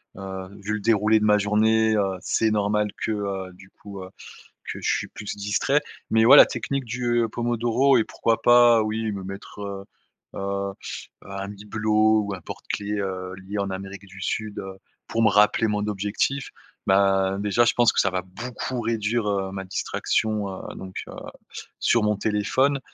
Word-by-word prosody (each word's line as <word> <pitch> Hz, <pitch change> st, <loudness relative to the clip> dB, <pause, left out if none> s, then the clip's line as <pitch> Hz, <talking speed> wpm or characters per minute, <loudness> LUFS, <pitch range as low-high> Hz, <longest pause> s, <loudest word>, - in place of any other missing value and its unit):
heu, 95 Hz, -1 st, -6 dB
vu 105 Hz, +2 st, -3 dB
le 105 Hz, -, -1 dB
déroulé 110 Hz, 0 st, +3 dB
de 105 Hz, -, 0 dB
ma 105 Hz, 0 st, +5 dB
journée, 110 Hz, +2 st, +3 dB
heu, 95 Hz, -2 st, 0 dB
c'est 110 Hz, -1 st, +1 dB
normal 105 Hz, 0 st, +1 dB
que, -, -, -1 dB
heu, 100 Hz, -3 st, -3 dB
du 95 Hz, +1 st, -17 dB
coup, 100 Hz, -2 st, -10 dB
heu, 95 Hz, -, -10 dB, 0.6 s
que -, -, -6 dB
je -, -, +1 dB
suis -, -, -4 dB
plus 105 Hz, -1 st, -7 dB
distrait 105 Hz, +8 st, +1 dB, 0.3 s
mais 110 Hz, 0 st, +4 dB
ouais, 135 Hz, +5 st, +9 dB
la -, -, +11 dB
technique 140 Hz, -1 st, -3 dB
du 120 Hz, 0 st, 0 dB
pomodoro 120 Hz, +3 st, +2 dB
et 115 Hz, -, +4 dB
pourquoi 115 Hz, 0 st, -1 dB
pas, 120 Hz, -2 st, +6 dB
oui, 110 Hz, 0 st, -2 dB
me 95 Hz, -1 st, -5 dB
mettre, 95 Hz, +2 st, -9 dB
heu 100 Hz, -1 st, -5 dB, 0.5 s
heu, 100 Hz, 0 st, -2 dB, 0.5 s
un 100 Hz, 0 st, -6 dB
bibelot 110 Hz, +1 st, +1 dB
ou 100 Hz, -1 st, -4 dB
un 90 Hz, -, -8 dB
porte-clé, 105 Hz, +4 st, -5 dB
heu, 95 Hz, -1 st, -4 dB
lié 95 Hz, +2 st, -6 dB
en 100 Hz, -1 st, -1 dB
Amérique 95 Hz, +1 st, -7 dB
du 95 Hz, 0 st, -13 dB
Sud, 105 Hz, +1 st, -3 dB
heu, 95 Hz, 0 st, -7 dB, 0.3 s
pour 115 Hz, -, -1 dB
me 110 Hz, -, +6 dB
rappeler 105 Hz, +2 st, +4 dB
mon 105 Hz, 0 st, -1 dB
objectif, 105 Hz, +7 st, -1 dB, 0.4 s
ben, 95 Hz, 0 st, +3 dB
déjà, 105 Hz, +3 st, +2 dB
je 120 Hz, -, +2 dB
pense 120 Hz, -1 st, +4 dB
que -, -, +2 dB
ça 95 Hz, -, +2 dB
va 90 Hz, 0 st, -2 dB
beaucoup 120 Hz, +6 st, -5 dB
réduire, 115 Hz, 0 st, -1 dB
heu, 95 Hz, -1 st, -1 dB
ma 95 Hz, 0 st, -4 dB
distraction, 105 Hz, +2 st, -1 dB
heu 95 Hz, -, -7 dB
donc 95 Hz, 0 st, -9 dB
heu, -, -, -9 dB, 0.7 s
sur 115 Hz, -, +3 dB
mon 105 Hz, -1 st, +1 dB
téléphone 110 Hz, +7 st, +1 dB
105 Hz, 180 wpm, -24 LUFS, 95-110 Hz, 0.7 s, la